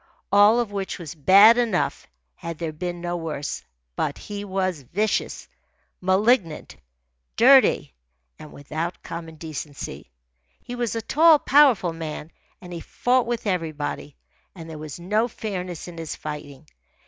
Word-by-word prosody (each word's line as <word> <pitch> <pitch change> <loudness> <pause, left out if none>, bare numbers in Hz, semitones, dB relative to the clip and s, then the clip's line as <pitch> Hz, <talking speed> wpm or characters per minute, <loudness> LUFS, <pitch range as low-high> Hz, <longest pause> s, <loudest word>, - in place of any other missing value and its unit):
All 205 +3 +6
of 235 -4 -2
which 195 -1 -4
was 165 -5 -8
bad 200 - +7
enough 225 -7 -1 0.3
had 170 - -7
there 165 -1 -3
been 175 +2 -5
no 175 0 -3
worse. 160 -4 -4 0.3
But - - -2
he 205 -1 -7
was 185 -5 -2
vicious, 205 - -2 0.5
malignant, 190 - +1 0.6
dirty, - - +5 0.5
and 150 - -11
without 160 +5 -5
common 165 -1 -7
decency. 150 - -7 0.5
He 245 - -9
was 240 -2 -2
a 225 - -3
tall, 315 +6 +6
powerful 270 - +4
man, 160 -1 -6 0.3
and 180 -1 -10
he 170 - -5
fought 245 +7 0
with 235 -2 -3
everybody. 155 -6 -3 0.4
And 165 -3 -9
there 160 -2 -8
was 155 +1 -8
no 210 +6 +1
fairness 185 -8 -6
in 170 -1 -9
his 165 -2 -5
fighting. 150 -1 -8
175 Hz, 140 wpm, -24 LUFS, 160-210 Hz, 0.6 s, bad